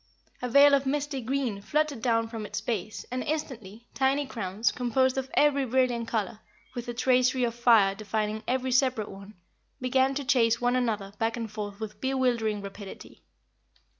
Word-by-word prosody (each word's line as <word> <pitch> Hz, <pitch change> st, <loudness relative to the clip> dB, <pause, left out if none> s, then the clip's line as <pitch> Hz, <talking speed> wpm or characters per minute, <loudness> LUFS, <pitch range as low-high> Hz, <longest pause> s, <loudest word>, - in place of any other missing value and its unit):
A 250 Hz, -, -2 dB
veil 280 Hz, +3 st, +7 dB
of 275 Hz, -1 st, +3 dB
misty 285 Hz, -1 st, -1 dB
green 250 Hz, -4 st, -2 dB
fluttered 290 Hz, +3 st, -1 dB
down 230 Hz, -1 st, +1 dB
from 225 Hz, -1 st, -6 dB
its 205 Hz, -, -4 dB
base, 215 Hz, -3 st, -4 dB
and, 255 Hz, 0 st, -2 dB
instantly, 240 Hz, -8 st, -5 dB
tiny 275 Hz, +1 st, +1 dB
crowns, 220 Hz, -3 st, -1 dB
composed 255 Hz, +1 st, +1 dB
of 265 Hz, 0 st, -3 dB
every 285 Hz, -2 st, +4 dB
brilliant 250 Hz, -2 st, +1 dB
color, 215 Hz, -2 st, -2 dB, 0.3 s
with 240 Hz, -1 st, -6 dB
a 240 Hz, -, -3 dB
tracery 255 Hz, +1 st, +2 dB
of 235 Hz, -1 st, 0 dB
fire 230 Hz, -5 st, +4 dB
defining 215 Hz, +1 st, -3 dB
every 260 Hz, 0 st, 0 dB
separate 255 Hz, -4 st, +1 dB
one, 195 Hz, +2 st, -11 dB, 0.4 s
began 260 Hz, +1 st, +2 dB
to 280 Hz, 0 st, -3 dB
chase 235 Hz, -3 st, +3 dB
one 245 Hz, +1 st, +1 dB
another 215 Hz, -6 st, -1 dB
back 225 Hz, +1 st, 0 dB
and 225 Hz, -3 st, -5 dB
forth 205 Hz, -1 st, -6 dB
with 220 Hz, -1 st, -7 dB
bewildering 240 Hz, -6 st, 0 dB
rapidity. 200 Hz, 0 st, -10 dB
240 Hz, 165 wpm, -27 LUFS, 215-265 Hz, 0.4 s, veil